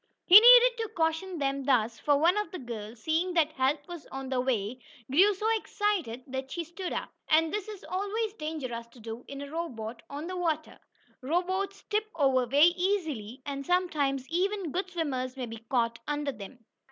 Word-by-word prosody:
He - - 0
needed - - +8
to 450 -1 -2
caution 325 +3 0
them 275 -1 -1
thus, 235 -4 +1
for 290 -1 +3
one 335 +6 +4
of 420 -3 -1
the 365 - -6
girls, 225 -3 -8
seeing 340 +3 0
that 315 -2 +3
help 285 +1 0
was 345 -3 -9
on 270 -1 -6
the 260 -2 0
way, 245 -2 -1 0.3
grew 375 +9 +6
so 425 - -5
excited 390 - -2
that 265 0 -5
she 340 +4 -3
stood 345 +3 -6
up, - - -4 0.2
and 320 +1 +3
this 420 -1 -3
is 420 -3 -9
always 410 +3 -2
dangerous 275 - -5
to 235 +1 -18
do 225 +2 -7
in 280 0 -7
a 285 - -9
rowboat 235 -9 -5
on 290 +3 -6
the 370 +2 -5
water. 320 -3 -2 0.4
Rowboats 375 +7 -1
tip 425 0 -1
over 265 -5 +2
very 290 +7 +5
easily, 315 - -2
and 275 -1 -4
sometimes 285 -6 0
even 375 0 -1
good 370 +3 -2
swimmers 270 -7 -3
may 255 - -3
be 225 -1 -9
caught 230 -2 0
under 295 -1 -1
them. 230 +1 -11
300 Hz, 190 wpm, -29 LUFS, 255-365 Hz, 0.4 s, needed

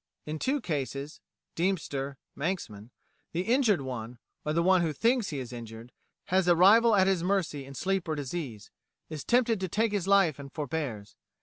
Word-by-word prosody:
In 155 +1 -4
two 275 - 0
cases 140 - -4 0.3
('Deemster,' 145 -7 -1 0.2
'Manxman,') 130 - -4 0.4
the 170 - 0
injured 225 - +2
one, 125 -2 -6 0.3
or 150 - -1
the 170 +2 +2
one 185 0 +4
who 160 -3 0
thinks 235 - +1
he 150 - -4
is 125 -2 -6
injured, 115 0 -9 0.4
has 190 -1 +3
a 175 - +6
rival 215 +6 +6
at 190 -2 +5
his 190 -3 +2
mercy 180 -7 -1
in 135 +1 -11
sleep 190 +1 -1
or 155 - -1
disease, 135 -7 -5 0.4
is 155 -3 -6
tempted 240 -3 +2
to 190 - -2
take 220 +5 +1
his 200 -3 -1
life 195 -8 +4
and 140 -1 -9
forbears. 145 -10 -4
165 Hz, 180 wpm, -29 LUFS, 135-195 Hz, 0.4 s, a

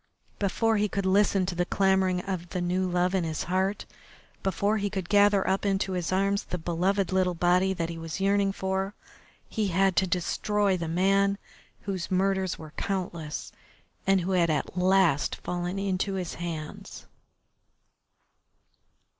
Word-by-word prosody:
Before 220 +3 +1
he 210 0 +1
could 200 0 -2
listen 195 0 +3
to 180 - -3
the 175 +1 0
clamouring 190 -1 +2
of 180 -2 -4
the 180 - -3
new 180 +1 0
love 180 +1 +1
in 190 -2 +1
his 160 -2 -2
heart, 190 +3 -1 0.6
before 200 +3 +1
he 205 -1 -1
could 190 -3 -4
gather 205 -1 +4
up 190 - +1
into 195 -1 0
his 180 -2 -2
arms 195 +1 +1
the 180 - -4
beloved 180 +4 0
little 185 -1 +1
body 180 +3 +3
that 165 -1 -2
he 165 -1 -6
was 165 +2 -5
yearning 200 0 +2
for, 190 +1 -2 0.5
he 215 -2 -1
had 190 +1 +2
to 190 - +3
destroy 195 +3 0
the 170 -2 -3
man 195 +4 +2 0.4
whose 190 -4 -4
murders 190 0 +1
were 155 -1 -11
countless 175 -6 -4 0.6
and 195 -1 +4
who 180 +2 -2
had 175 -3 +3
at 150 +2 -1
last 180 -5 +3
fallen 175 +1 -4
into 195 0 -1
his 180 -3 -3
hands. 165 -3 -7
190 Hz, 155 wpm, -27 LUFS, 175-195 Hz, 0.6 s, gather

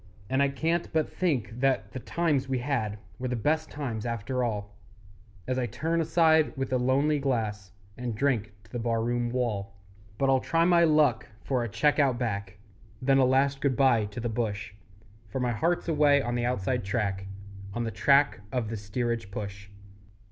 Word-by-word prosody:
And 130 +1 +2
I 140 - +4
can't 165 +5 -1
but 160 -1 +2
think 125 - -1
that 135 0 +1
the 130 - -5
times 145 -2 0
we 130 - +1
had 120 -5 -1 0.2
Were 130 - -2
the 125 - -1
best 155 +7 0
times 125 -7 -4
after 120 +2 -2
all, 105 -3 -3 0.7
As 130 0 0
I 125 - 0
turn 165 +9 -1
aside 160 -2 +3
with 135 -1 -2
a - - +4
lonely 140 +4 +2
glass 110 -8 -2 0.3
And 120 -3 -3
drink 115 -4 0
to - - -22
the 120 - -3
bar 115 -1 0
room 120 0 0
wall. 105 -6 -2 0.4
But 135 - +1
I'll 135 -1 +4
try 165 +5 +1
my 170 -1 +5
luck 150 -8 +3 0.2
for 130 -3 0
a 120 - -3
cheque 150 +8 +2
Out 135 -4 +3
Back, 100 -5 -3 0.4
Then 135 +1 +3
a 130 - +5
last 135 +2 +2
good 140 -3 +1
bye 130 -6 +4
to 105 +2 -7
the 120 - -2
bush; 110 -3 -3 0.5
For 105 - -4
my 125 -1 0
heart's 165 +11 0
away 150 -3 +4
on 120 -3 -2
the 120 0 0
Outside 125 0 -1
Track, 95 -1 -2 0.5
On 120 - -1
the 115 - -2
track 140 -1 +3
of 125 -4 -1
the 115 - -3
steerage 115 +1 -3
push. 100 0 -7
125 Hz, 190 wpm, -28 LUFS, 110-140 Hz, 0.7 s, my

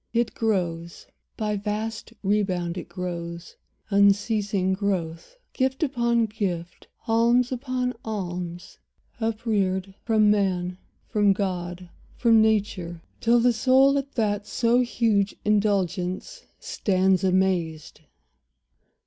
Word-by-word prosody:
It 235 0 +1
grows— 170 -6 -2 0.3
By 210 -1 -1
vast 215 +2 -4
rebound 190 -4 0
it 180 - -7
grows, 170 -2 -6 0.4
unceasing 200 -1 +2
growth; 190 - -3 0.2
Gift 265 +3 0
upon 235 -4 +1
gift, 185 -6 -4 0.2
alms 235 +2 +3
upon 255 0 -2
alms, 180 -4 -5 0.4
upreared, 210 -4 -1
From 215 -2 +3
man, 185 -3 0 0.3
from 205 -2 +3
God, 180 -2 -4 0.3
from 230 -2 +5
nature, 195 -6 0 0.2
till 235 +1 +4
the 245 +1 +3
soul 265 +4 +4
At 275 +1 -7
that 210 -3 -1
so 235 +1 +2
huge 225 -5 +1
indulgence 200 -3 0
stands 190 -1 +1
amazed. 180 -4 0
205 Hz, 100 wpm, -25 LUFS, 180-225 Hz, 0.4 s, from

